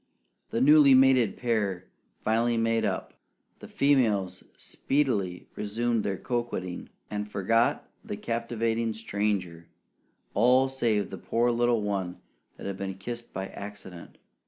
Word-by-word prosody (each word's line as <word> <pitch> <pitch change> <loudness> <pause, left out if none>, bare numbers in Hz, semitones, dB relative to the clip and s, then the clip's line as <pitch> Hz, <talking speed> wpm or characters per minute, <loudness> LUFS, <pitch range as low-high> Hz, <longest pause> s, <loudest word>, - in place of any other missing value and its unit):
The 115 - -1
newly 145 -1 +7
mated 130 -5 +4
pair 105 -7 -1 0.4
finally 115 +2 +2
made 115 0 +1
up; 95 -2 -3 0.5
the - - -10
females 110 -10 +1
speedily 105 -11 -1
resumed 115 +2 -1
their 100 -2 -2
coquetting, 120 -8 -4 0.2
and 105 0 -3
forgot 115 +4 +1 0.2
the - - -5
captivating 115 -1 -1
stranger 100 -6 -2 0.7
all 125 +5 +4
save 115 -6 0
the - - -7
poor 120 +1 +1
little 120 -2 +2
one 95 -3 -2 0.4
that - - -9
had 100 -1 -4
been 95 -1 -4
kissed 120 +4 -7
by 95 0 -5
accident. 100 -4 -10
115 Hz, 125 wpm, -28 LUFS, 100-120 Hz, 0.7 s, newly